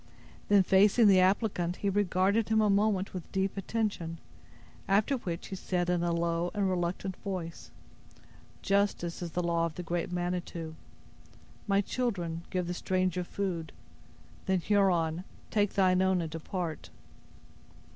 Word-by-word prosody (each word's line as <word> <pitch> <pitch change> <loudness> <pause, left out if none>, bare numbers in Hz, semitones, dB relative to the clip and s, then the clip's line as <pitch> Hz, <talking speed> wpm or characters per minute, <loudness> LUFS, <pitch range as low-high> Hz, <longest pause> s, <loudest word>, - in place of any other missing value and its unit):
Then, 200 -2 +6
facing 200 +5 +5
the 190 -2 +6
applicant, 185 -2 +1
he 200 - -1
regarded 200 +2 +2
him 220 0 +3
a 210 -1 +4
moment 200 -1 +1
with 180 -3 -7
deep 190 0 -1
attention; 195 -5 -2 0.7
after 210 +8 +2
which 175 -7 -5
he 190 - -4
said, 180 -1 -1
in 175 -1 +1
a 175 0 0
low 170 +1 0
and 200 -1 +1
reluctant 185 +1 -2
voice: 180 -4 -6 0.9
"Justice 195 -4 0
is 170 -2 -5
the 180 - -1
law 170 -1 +1
of 160 - -9
the 180 - -5
great 175 +1 -2
Manitou. 175 -2 -3 0.9
My 200 0 +3
children, 185 -8 -2
give 180 -1 -1
the 175 - -3
stranger 185 0 0
food. 175 -4 -4 0.7
Then, 190 -1 +2
Huron, 180 -4 +2 0.3
take 205 -2 +1
thine 185 -1 +4
own 190 -1 +3
and 165 -2 -3
depart." 165 0 -4
185 Hz, 145 wpm, -30 LUFS, 170-200 Hz, 0.9 s, Then